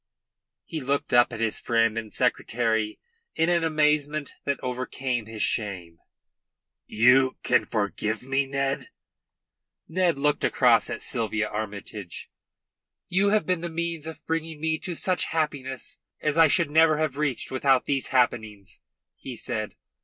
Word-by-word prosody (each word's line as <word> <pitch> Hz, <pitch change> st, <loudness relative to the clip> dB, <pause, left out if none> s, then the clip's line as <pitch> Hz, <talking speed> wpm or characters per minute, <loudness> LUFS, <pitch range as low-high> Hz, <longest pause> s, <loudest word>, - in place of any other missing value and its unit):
He 160 Hz, -3 st, -5 dB
looked 140 Hz, +1 st, -1 dB
up 120 Hz, +1 st, +5 dB
at 115 Hz, -, -6 dB
his 115 Hz, -1 st, 0 dB
friend 115 Hz, -1 st, +2 dB
and 110 Hz, -2 st, -5 dB
secretary 110 Hz, -2 st, 0 dB, 0.4 s
in 165 Hz, -, +2 dB
an 170 Hz, -1 st, +2 dB
amazement 150 Hz, -1 st, +1 dB
that 140 Hz, -1 st, -1 dB
overcame 125 Hz, -2 st, -3 dB
his 110 Hz, -1 st, -3 dB
shame. 90 Hz, -6 st, -2 dB, 0.9 s
"You 125 Hz, +4 st, +4 dB
can -, -, +3 dB
forgive 110 Hz, +1 st, -2 dB
me, 135 Hz, +1 st, 0 dB
Ned?" 135 Hz, 0 st, -2 dB, 1.0 s
Ned 175 Hz, -2 st, +1 dB
looked 145 Hz, +1 st, +1 dB
across -, -, +4 dB
at -, -, -5 dB
Sylvia 110 Hz, -1 st, -1 dB
Armytage. 105 Hz, -3 st, -6 dB, 0.8 s
"You 190 Hz, +3 st, +3 dB
have 215 Hz, +1 st, +2 dB
been 180 Hz, -2 st, 0 dB
the 170 Hz, -, -3 dB
means 165 Hz, -1 st, -3 dB
of 160 Hz, -, -9 dB
bringing 160 Hz, -1 st, -3 dB
me 160 Hz, 0 st, 0 dB
to 175 Hz, -, -4 dB
such 185 Hz, +2 st, 0 dB
happiness 140 Hz, -5 st, -3 dB, 0.2 s
as 150 Hz, -1 st, 0 dB
I 165 Hz, -1 st, +7 dB
should 155 Hz, 0 st, +2 dB
never 160 Hz, 0 st, +5 dB
have 155 Hz, -3 st, -1 dB
reached 140 Hz, -4 st, -2 dB
without 130 Hz, 0 st, +2 dB
these 135 Hz, -2 st, -1 dB
happenings," 110 Hz, -6 st, -1 dB, 0.4 s
he 130 Hz, -, -7 dB
said. 110 Hz, -4 st, -4 dB
135 Hz, 145 wpm, -26 LUFS, 115-155 Hz, 1.0 s, I